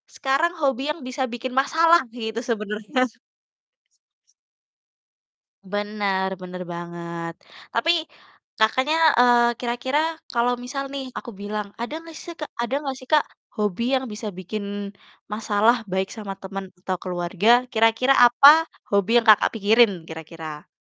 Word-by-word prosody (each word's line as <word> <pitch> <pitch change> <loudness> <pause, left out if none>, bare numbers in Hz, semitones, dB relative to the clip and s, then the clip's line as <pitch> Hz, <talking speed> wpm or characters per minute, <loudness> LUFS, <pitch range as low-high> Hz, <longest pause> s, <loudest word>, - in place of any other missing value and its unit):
sekarang 290 +6 +1
hobi 270 -3 +1
yang 300 - -7
bisa 260 +1 -2
bikin 250 +1 -5
masalah 330 +4 +4 0.2
gitu, 220 0 -4
sebenarnya. 215 +3 -2 2.6
Bener 205 -1 -1
bener 180 0 -7
banget. 170 -1 -6 0.4
Tapi 230 +9 +2 0.7
Kakaknya, 260 +8 +2 0.2
eee, 240 -1 +5
kira-kira 245 +4 -1 0.3
kalau 245 0 +2
misal 275 +2 -4
nih 275 -1 -4
aku 235 - -7
bilang 210 0 -4
ada 240 - -4
nggak 330 - -12
seh 340 - -8
Kak 300 - -6
ada 240 +3 -1
nggak 270 -2 -3
sih 255 - -14
Kak, 300 -1 +5 0.3
hobi 210 0 -1
yang 260 - 0
bisa 215 +1 -6
bikin 200 +3 -5 0.7
masalah, 215 +2 +2 0.2
baik 190 0 -1
sama 210 -3 -6
teman 195 0 -6
atau 185 0 -3
keluarga, 180 +3 -1 0.2
kira-kira 225 +3 +3
apa 245 +3 +7 0.4
hobi 200 +1 +2
yang 235 - +3
Kakak, 215 - +6
pikirin 220 +1 +4 0.2
kira-kira? 160 -1 -9
225 Hz, 130 wpm, -23 LUFS, 195-255 Hz, 2.6 s, apa